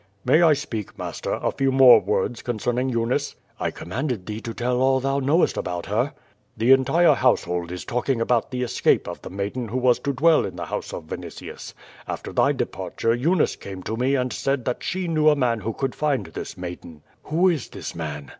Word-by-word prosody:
"May 160 - +5
I 165 -3 +6
speak, 115 -7 -5
master, - - -4
a - - -1
few 135 0 0
more 130 -3 +8
words 105 +3 -1
concerning 120 +2 -1
Eu 115 -2 0
nice?" 130 +4 -1 0.2
"I - - 0
commanded 115 - -4
thee 110 +1 -5
to 115 - -5
tell 125 +2 -1
all 130 0 +3
thou 135 +1 0
knowest 145 +6 +2
about 90 -1 -3
her." 120 +9 0 0.4
"The 115 +4 +3
entire 135 +5 +5
household 90 -9 +1
is 90 - -6
talking 125 +1 -1
about 115 0 +1
the 125 -1 -2
escape 120 - +1
of - - -6
the - - -8
maiden 100 +6 -4
who 115 +4 -3
was 125 -1 +3
to 140 - -2
dwell 155 +4 +4
in - - -5
the - - -5
house - - -4
of - - -6
Vinitius. - - -8 0.3
After - - -5
thy - - +3
departure 115 - -2
Eunice 155 +8 +1
came 95 -2 -9
to 110 - -3
me 130 +4 +1
and 125 -1 -1
said 135 -2 -1
that 125 - -2
she 185 -1 -2
knew 155 -2 +4
a 150 - +4
man 120 -5 +1
who 110 +2 -3
could 135 +3 -3
find 150 -3 0
this 80 - -7
maiden." 85 -3 -8 0.2
"Who 170 +5 +2
is 160 -7 -2
this - - -7
man?" 75 -4 -6
125 Hz, 210 wpm, -23 LUFS, 110-135 Hz, 0.4 s, more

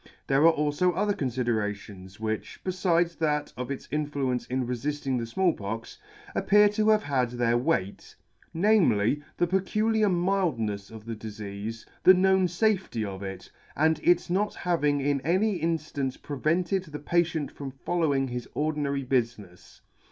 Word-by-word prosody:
'There 140 +4 +4
are 165 - +6
alfo 150 +5 +2
other 205 +2 +1
confiderations 105 - -3
which, 110 -1 -4
befides 175 -2 +1
that 150 -2 0
of 125 +1 -5
its 140 - -5
influence 140 -4 -1
in 130 0 -1
refilling 135 +1 -2
the 115 - -4
Small 180 +8 +2
Pox, 110 - -6 0.3
appear 210 +1 +5
to 215 +1 +1
have 215 -1 +4
had 130 -4 0
their 120 -1 +1
weight; 120 - -1 0.4
namely, 160 - +3 0.2
the 175 - +3
peculiar 215 +4 +1
mildnefs 170 - 0
of 110 -1 -11
the 115 -1 -4
difeafe, 105 0 -7 0.2
the 185 - +8
known 190 0 +3
fafety 180 - 0
of 95 -1 -6
it, 95 -1 -7 0.2
and 160 +1 +2
its 175 0 +3
not 200 +4 0
having 150 -5 +1
in 140 0 0
any 185 +4 +1
inflance 155 -5 -2
prevented 170 +6 -1
the 150 -3 -7
patient 160 0 0
from 140 -1 -7
following 140 -1 0
his 125 -1 -5
ordinary 145 -2 -1
bufinefs. 115 -8 -3
145 Hz, 145 wpm, -27 LUFS, 120-175 Hz, 0.4 s, the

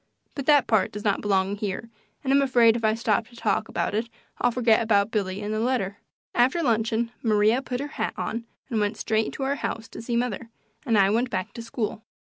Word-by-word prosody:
But 275 -2 -5
that 290 -3 +6
part 220 -4 +2
does 210 0 -7
not 205 -2 +1
belong 195 0 +1
here, 210 +2 -4 0.3
and 270 -1 +1
I'm 280 - +5
afraid 240 -4 +5
if 235 - -3
I 215 0 +3
stop 225 -1 0
to 240 - -18
talk 225 -1 0
about - - -1
it 225 +2 -1 0.3
I'll 245 - +3
forget 235 -2 +3
about 210 -2 +2
Billy 200 -2 -2
and 210 +1 -2
the 215 - -1
letter. 225 -5 0 0.4
After 260 +8 +3
luncheon 230 -1 +1
Maria 215 +2 +3
put 250 -2 -4
her 285 - -2 0.2
hat - - -1
on 230 +1 -3 0.3
and 225 - +1
went 210 +1 0
straight 220 0 0
to 275 - -4
our 275 +1 0
house 225 0 -3
to - - -8
see 235 +1 -2
mother, 235 -2 -2 0.4
and 225 -3 +3
I 195 0 +5
went 235 +3 +1
back 185 -4 -3
to 235 - -7
school. 225 -1 -4
225 Hz, 225 wpm, -25 LUFS, 210-240 Hz, 0.4 s, that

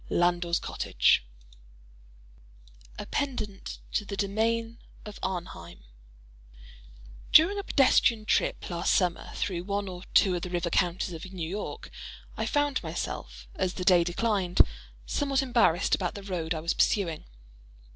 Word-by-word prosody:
LANDOR'S 175 0 +2
COTTAGE - - +2 1.7
A - - -5
Pendant 230 -8 -3
to - - 0
"The 200 -1 -6
Domain 225 +3 -1 0.3
of 210 -1 -9
Arnheim" 85 - -5 1.5
During 370 +6 +6
A - - -4
pedestrian 245 - +3
trip - - 0
last 170 - +1
summer, 180 -3 0
through 175 -3 -2
one 200 0 -2
or 180 -1 -7
two 190 -3 +5
of 175 - -3
the 180 - -5
river 175 -1 -2
counties 175 +1 0
of 170 +3 -8
New 175 -4 -4
York, 200 +5 -6 0.4
I - - -2
found 290 -2 +1
myself, 60 - -5
as 185 - -2
the 180 - -4
day 180 -2 +6
declined, 185 0 +2 0.4
somewhat 275 -2 0
embarrassed 230 -8 +2
about 180 -3 0
the 200 - -7
road 170 -4 -3
I 155 - -4
was 165 +1 0
pursuing. 170 -7 +1
185 Hz, 135 wpm, -28 LUFS, 170-215 Hz, 1.7 s, During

